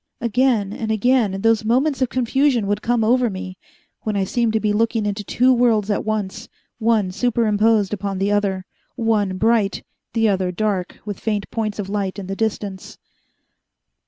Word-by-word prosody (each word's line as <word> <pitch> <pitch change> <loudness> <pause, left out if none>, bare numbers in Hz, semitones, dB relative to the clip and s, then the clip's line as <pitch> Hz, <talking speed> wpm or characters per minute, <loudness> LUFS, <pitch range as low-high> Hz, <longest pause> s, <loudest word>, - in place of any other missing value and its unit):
Again 235 -4 +1
and 220 0 -4
again 220 -3 +2
those 225 0 +3
moments 265 +6 +1
of 255 - +2
confusion 255 -1 +1
would 205 +1 -1
come 240 -1 +1
over 245 +2 +3
me, 185 -1 -7 0.4
when 215 -1 -2
I 195 - +1
seemed 230 +4 0
to 220 - +2
be 210 -1 0
looking 225 0 +1
into 205 0 -2
two 250 +5 +3
worlds 225 -4 +2
at 205 - 0
once, 215 -3 -3 0.3
one 220 -4 +2
superimposed 215 -2 +2
upon 200 -1 -3
the 195 +2 0
other, 195 -2 0 0.3
one 215 -5 0
bright, 220 -1 +1 0.3
the 225 -1 +2
other 190 -3 +1
dark 190 -1 -2
with 205 -3 -5
faint 210 -3 -2
points 215 -2 -2
of 205 -3 -4
light 200 -1 -2
in 200 - -6
the 195 +1 -4
distance. 205 -3 -3
215 Hz, 170 wpm, -21 LUFS, 200-230 Hz, 0.4 s, those